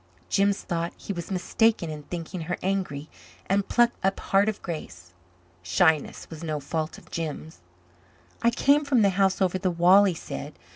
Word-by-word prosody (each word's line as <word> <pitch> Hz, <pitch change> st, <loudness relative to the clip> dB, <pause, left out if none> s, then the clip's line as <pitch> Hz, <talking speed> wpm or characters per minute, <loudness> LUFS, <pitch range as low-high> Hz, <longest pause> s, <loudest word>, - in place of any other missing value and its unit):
Jims 200 Hz, 0 st, +2 dB
thought 170 Hz, 0 st, -2 dB
he 200 Hz, -, -5 dB
was 170 Hz, -2 st, -6 dB
mistaken 195 Hz, -1 st, +1 dB
in 150 Hz, -1 st, -6 dB
thinking 170 Hz, +3 st, -6 dB
her 175 Hz, +2 st, -3 dB
angry 185 Hz, -7 st, -2 dB, 0.4 s
and 195 Hz, +1 st, 0 dB
plucked 240 Hz, -2 st, +2 dB
up 195 Hz, +1 st, +1 dB
heart 200 Hz, +2 st, +2 dB
of 215 Hz, -, -4 dB
grace. 90 Hz, -, -7 dB, 0.5 s
Shyness 150 Hz, -, +1 dB
was 160 Hz, 0 st, -8 dB
no 155 Hz, -2 st, -2 dB
fault 155 Hz, +3 st, -3 dB
of -, -, -17 dB
Jims. 160 Hz, -1 st, -5 dB, 0.8 s
"I 235 Hz, -, +4 dB
came 280 Hz, +5 st, +3 dB
from 265 Hz, -6 st, +3 dB
the 200 Hz, -, +4 dB
house 190 Hz, 0 st, +2 dB
over 185 Hz, 0 st, 0 dB
the 185 Hz, -1 st, 0 dB
wall," 180 Hz, +4 st, +6 dB
he 185 Hz, -4 st, +1 dB
said. 150 Hz, -2 st, -7 dB
180 Hz, 175 wpm, -26 LUFS, 160-200 Hz, 0.8 s, wall